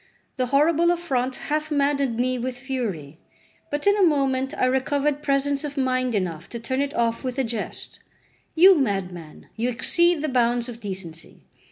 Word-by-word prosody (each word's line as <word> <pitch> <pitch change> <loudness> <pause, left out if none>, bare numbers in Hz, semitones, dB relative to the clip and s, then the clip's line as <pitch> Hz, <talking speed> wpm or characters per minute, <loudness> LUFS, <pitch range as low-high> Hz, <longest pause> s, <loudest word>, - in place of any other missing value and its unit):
The 255 -2 -1
horrible 310 +5 +3
affront 265 -8 -1
half 305 +1 -3
maddened 280 -4 +1
me 255 +1 0
with 250 +1 -4
fury; 215 - -5 0.5
but 290 0 -3
in 405 0 +5
a 415 - +1
moment 270 -5 +2
I - - +2
recovered 275 +3 0
presence 280 0 0
of 290 -1 -6
mind 255 -2 0
enough 175 -6 -3
to 235 - -6
turn 260 +4 -2
it 285 0 -3
off 230 +1 0
with 255 0 -4
a 270 - +1
jest; 230 -3 -6 0.6
"You 370 +4 +8
madman! 185 - -3
you 235 +2 -1
exceed 340 +7 +2
the - - 0
bounds 240 -2 +1
of 235 -2 -8
decency. 190 -6 -8
260 Hz, 170 wpm, -24 LUFS, 235-285 Hz, 0.6 s, You